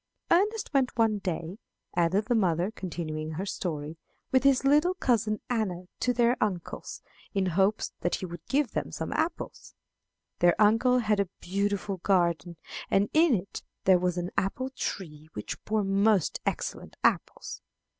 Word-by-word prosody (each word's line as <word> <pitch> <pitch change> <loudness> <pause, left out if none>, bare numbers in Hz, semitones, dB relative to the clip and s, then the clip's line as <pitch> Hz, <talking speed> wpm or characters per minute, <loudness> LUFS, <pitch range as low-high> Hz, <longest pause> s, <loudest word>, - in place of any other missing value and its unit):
"Ernest 415 +2 +2
went 265 -3 +1
one 220 -2 +3
day," 175 +1 -4 0.4
added 180 +4 +2
the 240 - +1
mother, 180 -3 +2
continuing 160 -5 -4
her 185 +5 -3
story, 155 -5 -4 0.3
"with 260 - +4
his 275 -1 +4
little 300 +6 +4
cousin 220 - +1
Anna 205 -7 -1 0.2
to 250 - +2
their 240 0 +3
uncle's, 185 -5 -4 0.3
in 195 -1 +2
hopes 190 +4 +1
that 175 - 0
he - - -5
would 170 -2 -8
give 280 -3 +1
them - - -3
some - - -4
apples. 325 +1 -3 0.6
Their 175 +2 +4
uncle 225 +4 +5
had 215 -4 +2
a 200 -3 +1
beautiful 200 +1 -1
garden, 170 -3 +1 0.3
and 200 +1 +2
in 315 -4 +5
it 190 0 -5 0.2
there 185 -1 +5
was 180 0 0
an 175 0 -2
apple 200 +7 -1
tree 155 - -5
which 105 - -6
bore 215 -1 +1
most 195 -1 +2
excellent - - -3
apples. - - 0
200 Hz, 155 wpm, -28 LUFS, 175-240 Hz, 0.6 s, uncle